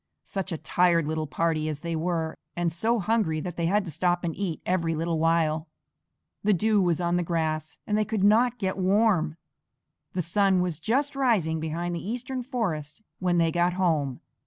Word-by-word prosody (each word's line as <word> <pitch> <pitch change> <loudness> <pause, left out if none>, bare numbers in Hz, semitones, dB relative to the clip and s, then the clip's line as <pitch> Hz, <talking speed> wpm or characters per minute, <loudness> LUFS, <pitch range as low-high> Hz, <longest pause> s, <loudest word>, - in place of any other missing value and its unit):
Such 190 -1 -4
a 165 - -2
tired 170 +1 +2
little 155 0 -2
party 155 0 0
as 150 -1 -5
they 170 -1 -3
were, 160 -1 -1 0.2
and 175 -2 0
so 225 +8 +1
hungry 210 -6 +1
that 175 0 -5
they 170 -1 0
had 205 +3 +2
to 165 - -6
stop 175 +3 0
and 165 -2 -2
eat 185 -5 -3
every 170 -3 0
little 165 0 -1
while. 160 -1 +2 0.8
The 205 -1 +4
dew 215 +2 +2
was 175 -3 +1
on 175 0 +1
the - - +1
grass 160 -2 -2
and 210 - 0
they 215 - +3
could 215 -2 -2
not 230 +4 +4
get 195 -3 -2
warm. 185 -5 +2 0.8
The 180 - -1
sun 190 +2 +2
was 175 -4 -1
just 270 - 0
rising 210 - +2
behind 165 +2 -3
the 170 - -4
eastern 250 +4 -3
forest 220 - -3 0.2
when 180 -1 +1
they 165 -1 +3
got 175 +1 +2
home. 155 -8 0
175 Hz, 190 wpm, -27 LUFS, 160-205 Hz, 0.8 s, The